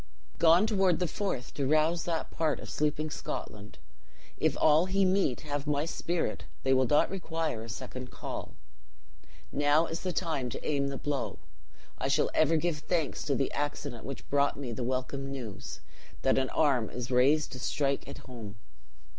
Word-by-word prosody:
"Gone 170 +4 +6
toward 195 -6 +3
the 180 - 0
Forth, 175 -7 -3
to 140 -2 -1
rouse 155 +3 +3
that 165 -2 -2
part 155 -3 0
of - - -8
sleeping 150 +1 0
Scotland. 105 -7 -6 0.6
If - - +2
all 155 +3 +5
he 195 +1 +3
meet 185 -9 +2
have 145 -1 -3
my 145 0 +1
spirit, 165 -7 -2 0.2
they 135 - +4
will 130 -1 +4
not 145 +7 +4
require 165 - -2
a 115 - -8
second 125 +4 -6
call. - - -6 1.0
Now 145 +3 +4
is 165 +1 -4
the 185 - -1
time 160 -8 -1
to - - -6
aim 140 -2 +1
the 140 -1 -3
blow; 140 -2 -2 0.6
I - - 0
shall - - +2
ever 155 +1 +4
give 160 -1 0
thanks 160 -1 -1
to 140 -3 +1
the 135 - 0
accident 145 -4 -3
which 135 -1 -7
brought 140 0 +2
me 135 -4 -4
the 120 +2 -3
welcome 130 +2 -2
news, 125 -7 -6 0.4
that - - +4
an 130 -1 0
arm 135 -8 +2
is 125 +1 -5
raised 140 +5 +4
to 125 - -6
strike 140 +1 0
it 140 - -7
home." 115 -5 -8
145 Hz, 175 wpm, -30 LUFS, 130-165 Hz, 1.0 s, Gone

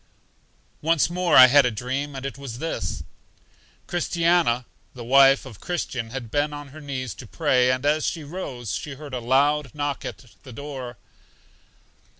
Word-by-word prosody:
Once 165 +1 +2
more 180 0 +3
I 130 - +12
had 140 +3 +6
a 125 - +2
dream, 130 +6 -4
and 135 0 -6
it 135 - -4
was 135 -4 -7
this: 130 - -4 0.8
Christiana, 170 -7 +1 0.3
the 120 - -8
wife 135 +3 +5
of 115 -7 -11
Christian, 130 -9 -3
had 120 -2 -7
been 150 +1 0
on 145 -1 -8
her 155 +3 -12
knees 130 -6 -4
to 120 +5 -11
pray, 125 -2 +2
and 130 +2 -2
as 150 +1 +2
she 165 - -3
rose, 140 - -6
she 145 -2 -5
heard 145 -1 -10
a 125 - -2
loud 140 +3 +1
knock 145 -1 -2
at - - -7 0.2
the 130 - -12
door. 130 -3 -7
135 Hz, 165 wpm, -24 LUFS, 125-150 Hz, 0.8 s, I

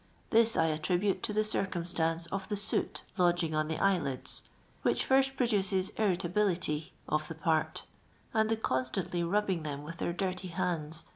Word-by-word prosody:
This 230 0 +5
1 160 0 +3
attribute 180 +5 +1
tu - - -2
the 215 +1 +1
circumstance 170 -5 -1
of 195 +1 -3
the 205 - -1
soot 205 +2 -2 0.2
h»d«;intf 175 -2 +3
on 155 0 +1
the 160 - -1
eyeiid». 175 -10 0 0.4
which - - +1
fir«si 270 0 +4
pro 270 -2 0
dutes 205 -5 +1 0.2
iriit.ihi'.ity 180 -5 0 0.2
of 155 0 0
thi> 160 - -6
]iart, 160 -1 0 0.5
und 220 -1 +3
the 225 - +2
constantly 170 +1 -1
ni!dii]i>r 190 0 +1
them 145 -1 -4
with 165 +3 -7
tht - - -12
ir 170 - 0
nirty 185 0 -2
hand*. 165 -3 -2
180 Hz, 165 wpm, -31 LUFS, 160-205 Hz, 0.5 s, This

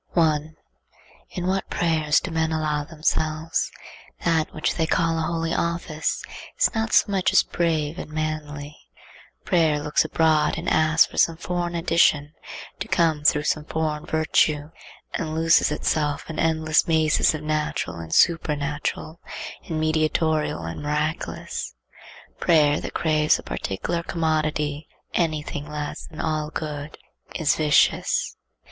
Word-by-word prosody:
1. 155 -2 +1 0.7
In 180 - -5
what 190 +1 -1
prayers 160 -3 +2
do 185 - -6
men 160 0 0
allow 155 -2 0
themselves! 155 +1 -1 0.5
That 165 -2 +2
which 155 - -1
they 160 -1 0
call 165 -1 +1
a 160 - -1
holy 165 -1 -1
office 170 -2 -2 0.3
is - - +3
not 225 0 -1
so 205 - +4
much 190 -2 +2
as - - +5
brave 160 -1 -1
and - - -7
manly. 155 -1 -4 0.7
Prayer 160 -5 +3
looks 150 0 +1
abroad 160 -1 +2
and - - -5
asks 155 0 +4
for - - -5
some 165 -1 +3
foreign 175 0 -3
addition 165 -3 +2 0.5
to - - -4
come 160 -4 +1
through 150 0 +4
some 155 0 0
foreign 155 -1 -2
virtue, 155 -1 +1 0.4
and 155 -1 -3
loses 165 -1 +4
itself 150 -1 -1
in - - -6
endless 160 -1 +2
mazes 160 -1 +3
of 155 - -6
natural 155 - -2
and 80 -1 -8
supernatural, 150 - 0 0.5
and 160 -2 -2
mediatorial 155 - +1
and 80 - -6
miraculous. 150 +2 -3 0.6
Prayer 150 -4 +3
that - - -7
craves 155 -2 +3
a - - -10
particular 135 - -3
commodity, 155 -3 -1 0.3
any 155 -3 0
thing 145 0 -6
less 150 -1 -5
than 155 - -12
all 155 -1 -1
good, 150 -1 -5 0.4
is 155 -2 +2
vicious. 150 -1 +2
155 Hz, 140 wpm, -24 LUFS, 150-165 Hz, 0.7 s, as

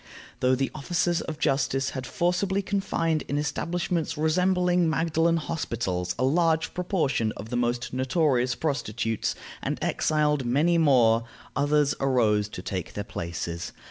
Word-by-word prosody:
Though 130 +1 +3
the 135 +1 -1
officers 175 +3 0
of 155 - -5
justice 135 -2 +1
had 130 -2 -5
forcibly 185 +5 0
confined 165 -6 0
in 145 - -1
establishments 165 +2 -2
resembling 180 +2 +2
Magdalen 165 +1 +2
hospitals 110 - -2
a - - 0
large 160 +2 +2
proportion 155 - 0
of 110 +2 -8
the - - -1
most 120 0 -1
notorious 130 -2 +1
prostitutes, 120 -7 -2 0.3
and - - -2
exiled 150 -2 +1
many 150 +8 +2
more, 120 -7 +4 0.3
others 145 +1 +2
arose 110 -6 +2
to 90 - -8
take 90 -4 -4
their 100 - -3
places. 85 -3 -5
145 Hz, 135 wpm, -26 LUFS, 120-165 Hz, 0.3 s, more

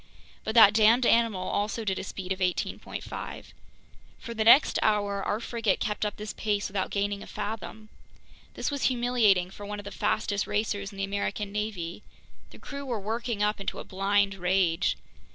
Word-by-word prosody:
But 220 - -3
that 215 -3 +9
damned 225 +3 +5
animal 230 -6 +3
also 210 +2 -1
did 190 -2 -1
a - - -4
speed 190 -1 -6
of 190 - -1
18.5. 180 -1 -3 0.7
For 235 - -7
the 220 -1 0
next 235 +6 +6
hour 205 -2 +1
our 205 - -1
frigate 230 -4 -1
kept 210 0 -1
up 205 - -5
this 210 0 -6
pace 205 -2 -1
without 195 -1 -2
gaining 200 0 -1
a - - -9
fathom! 215 +1 -6 0.7
This - - -2
was 285 -1 -1
humiliating 235 -7 +3
for 205 - -10
one 205 +1 -5
of 205 - -8
the 200 - -6
fastest 205 +1 -1
racers 205 -1 -1
in 200 - -12
the 195 - -2
American 200 +1 -2
navy. 205 -4 -4 0.5
The - - -14
crew 280 0 -7
were 245 -5 -3
working 225 +1 -2
up 210 +1 +1
into 195 - -4
a - - -5
blind 200 +1 +1
rage. 180 -1 +1
205 Hz, 180 wpm, -28 LUFS, 195-220 Hz, 0.7 s, that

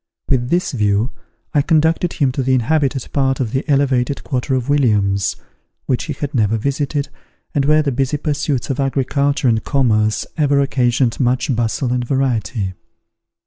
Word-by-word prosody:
With 125 -3 +1
this 175 +2 +1
view, 105 -1 +1 0.4
I 145 - +4
conducted 160 +3 +2
him 140 -5 +1
to 135 - -2
the 130 0 +2
inhabited 135 +1 0
part 135 -2 +1
of 120 -5 -1
the 135 +2 -1
elevated 140 -1 +1
quarter 130 0 -1
of 125 -1 -2
Williams, 105 -9 +2 0.5
which 125 - -1
he 155 - -3
had 145 +2 -5
never 110 -3 +2
visited, 140 +4 -2 0.4
and 140 -1 +1
where 155 +1 +4
the 140 - 0
busy 135 +3 0
pursuits 145 -3 -1
of 135 - -3
agriculture 140 +1 0
and 110 -2 +2
commerce 110 -6 +1
ever 145 -2 +3
occasioned 125 -2 +1
much 130 0 +1
bustle 120 +2 -1
and 125 -1 0
variety. 120 -6 -1
135 Hz, 160 wpm, -18 LUFS, 120-145 Hz, 0.5 s, I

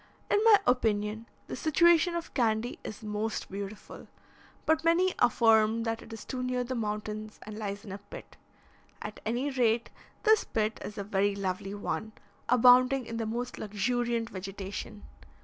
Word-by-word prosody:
In 415 - +3
my 440 -2 +9
opinion, 220 -2 +1 0.2
the - - -6
situation 340 +2 +4
of 340 -1 -5
Candy 230 -1 0
is 215 - -8
most 215 0 -3
beautiful, 200 +2 -7 0.6
but 315 0 +2
many 350 +3 +3
affirm 225 -1 +4
that 225 0 -2
it - - -13
is 225 -1 -8
too 255 - -4
near 250 0 -1
the 250 +1 -4
mountains, 215 -1 -4
and 215 - -8
lies 200 0 -5
in 200 - -8
a 195 - -6
pit. 205 - -12 0.7
At 210 - -7
any 250 +6 0
rate, 235 -3 +1 0.3
this 435 -1 +5
pit 215 0 -2
is 210 - -7
a 200 - -3
very 200 0 +1
lovely 195 0 -3
one, 215 +1 -4 0.4
abounding 250 +2 +6
in 230 - -5
the 225 -1 -2
most 240 +3 -4
luxuriant 230 +2 -1
vegetation. 195 +2 -6
225 Hz, 160 wpm, -29 LUFS, 210-250 Hz, 0.7 s, my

